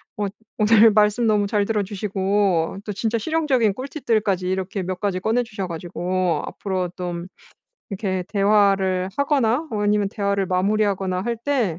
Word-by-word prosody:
엇 205 -2 -2 0.3
오늘 220 +1 +6
말씀 210 +2 +3
너무 210 -2 +2
잘 205 -1 +1
들어주시고 200 -4 0
또 210 - -4
진짜 225 +3 -1
실용적인 260 -4 +1
꿀팁들까지 215 - -1
이렇게 190 +1 -2
몇 180 0 -4
가지 195 -2 -1
꺼내 225 +6 +1
주셔 210 -4 -5
가지고 175 +1 -2
앞으로 185 -3 -3
쫌 175 -1 -5 0.6
이렇게 190 -2 -2
대화를 195 -2 +2
하거나 280 +2 +1
아니면 210 -1 +1
대화를 200 -2 -1
마무리하거나 190 0 0
할 235 +2 -2
때 235 - -1
200 Hz, 330 characters per minute, -22 LUFS, 185-220 Hz, 0.6 s, 오늘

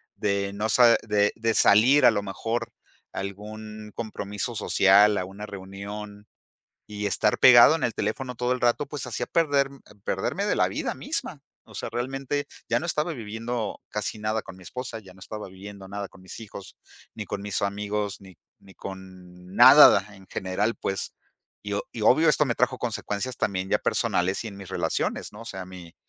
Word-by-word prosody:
de 100 -1 -1
no 105 +2 -2
se 120 +1 +6
de 110 +1 +1
salir 125 +7 +6
a - - +8
lo 100 - -1
mejor 115 +4 -3 0.4
a - - -5
algún 105 +2 -8
compromiso 105 +1 -4
social, 100 0 +5
a 90 - -1
una 100 +3 -9
reunión 100 +2 -8 0.6
y 105 -1 -4
estar 100 - +1
pegado 125 +5 +8
en 165 - -3
el 115 - 0
teléfono 130 -2 -3
todo 125 +1 -1
el 125 - -2
rato, 120 +4 +1
pues 145 -2 -6
hacía 120 0 -3
perder 145 -4 +2 0.4
perderme - - -1
de - - 0
la - - +3
vida - - -3
misma, - - -4 0.3
o - - -16
sea, - - -4
realmente 135 +3 -3 0.2
ya - - +2
no - - -6
estaba 170 -1 -1
viviendo 115 -1 -4
casi 105 +1 -3
nada 110 +1 -1
con 95 - -11
mi 95 - -15
esposa, 125 -1 -6
ya 95 -4 -15
no 95 - -18
estaba 105 +2 -7
viviendo 95 +1 -11
nada 100 0 -5
con 95 - -18
mis 95 - -10
hijos, 100 -3 -10 0.4
ni 105 - -5
con 100 +1 -5
mis 100 -1 -3
amigos, 100 0 -2
ni 95 -4 -15 0.2
ni 95 - -18
con 95 -1 -11
nada 105 - +8
en 95 -1 -16
general, 100 +6 -2
pues, 95 - -3 0.5
y 100 0 -5
o 100 - -1
y 115 - -6
obvio 155 +9 +5
esto 150 - +4
me 120 -4 -1
trajo 125 +1 +1
consecuencias 120 0 -3
también 95 -1 -2
ya - - +3
personales 95 +5 0
y 115 - -4
en 100 - -10
mis 95 -2 -10
relaciones, 95 - -2
¿no?, 105 - -11
o - - -9
sea, 95 -4 -6
mi 90 -2 -12
105 Hz, 190 wpm, -26 LUFS, 100-120 Hz, 0.6 s, a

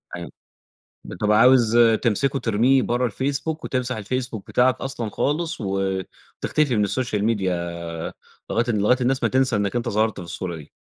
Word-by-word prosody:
أيوه 85 0 -7 0.7
بتبقى 105 +3 0
عاوز 120 -2 +5 0.3
تمسكه 135 +4 +1
ترميه 120 +4 +3
برّه 120 0 0
الFacebook 140 +7 -2
وتمسح 125 -1 -1
الFacebook 120 +1 -3
بتاعك 125 0 +2
أصلًا 120 -5 -3
خالص 160 +5 -1
وتختفي 95 - -2
من 105 - +2
السوشيال 105 -1 -1
ميديا 100 -5 +1 1.0
لغاية 115 - +1
لغاية 105 +4 +2
الناس 130 +1 +1
ما - - +3
تنسى 130 -2 +2
إنك 100 0 -1
أنت 120 0 -1
ظهرت 110 -1 0
في 90 - -7
الصورة 85 0 -5
دي. 75 -3 -12
115 Hz, 150 wpm, -23 LUFS, 105-130 Hz, 1.0 s, عاوز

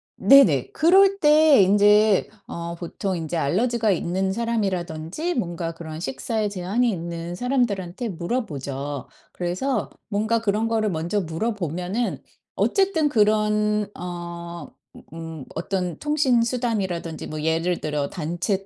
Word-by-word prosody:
네네. 185 - +5
그럴 385 +5 +4
때 300 -5 +6
인제 205 +1 +4 0.2
어 170 0 -5
보통 185 +3 -4
인제 165 0 -3
알러지가 220 - +1
있는 190 +2 -1
사람이라든지 200 - -2
뭔가 170 -6 -3
그런 160 -1 -7
식사에 205 - -2
제한이 200 +6 0
있는 170 -2 -4
사람들한테 235 -4 -1
물어보죠. 145 - -4 0.3
그래서 185 +10 -2 0.2
뭔가 220 +2 0
그런 215 +1 0
거를 220 -2 +1
먼저 175 +4 -1
물어보면은 180 +3 -3 0.3
어쨌든 380 -6 +2
그런 210 -3 +2
어 170 -1 -7 0.5
으음 165 -4 -7
어떤 180 -1 -3
통신 285 -5 +2
수단이라든지 210 -9 -2
뭐 155 - -5
예를 165 +2 0
들어 150 -2 -2
단체 175 +4 -2
190 Hz, 275 characters per minute, -23 LUFS, 170-230 Hz, 0.5 s, 때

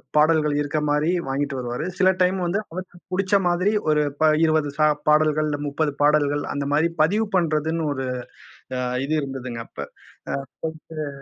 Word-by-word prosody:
பாடல்கள் 150 -1 +4
இருக்க 145 +1 -1
மாரி 150 +2 +2 0.2
வாங்கிட்டு 140 0 -2
வருவாரு. 125 +4 -3
சில 190 -1 +5
டைம் 185 +1 +3
வந்து 180 +4 0
அவருக்குப் 175 0 -9
புடிச்ச 190 +2 -1
மாதிரி 180 +4 +2 0.2
ஒரு 150 0 +3 0.2
ப 155 0 +5
20 155 -2 +2
சா 155 - +4 0.2
பாடல்கள், 155 0 +3
இல்ல 145 - -1
30 145 +1 0
பாடல்கள் 145 0 +3
அந்த 140 0 -2
மாரி 155 +3 +3
பதிவு 205 +8 +3
பண்றதுன்னு 160 -1 +1
ஒரு 135 -1 -3 0.7
அ - - -2 0.3
இது 150 - -2
இருந்துதுங்க 130 -4 -5
அப்ப. - - -16 0.5
அ - - -1 0.4
போயிட்டு 155 -1 -7
155 Hz, 160 wpm, -23 LUFS, 145-165 Hz, 0.7 s, சில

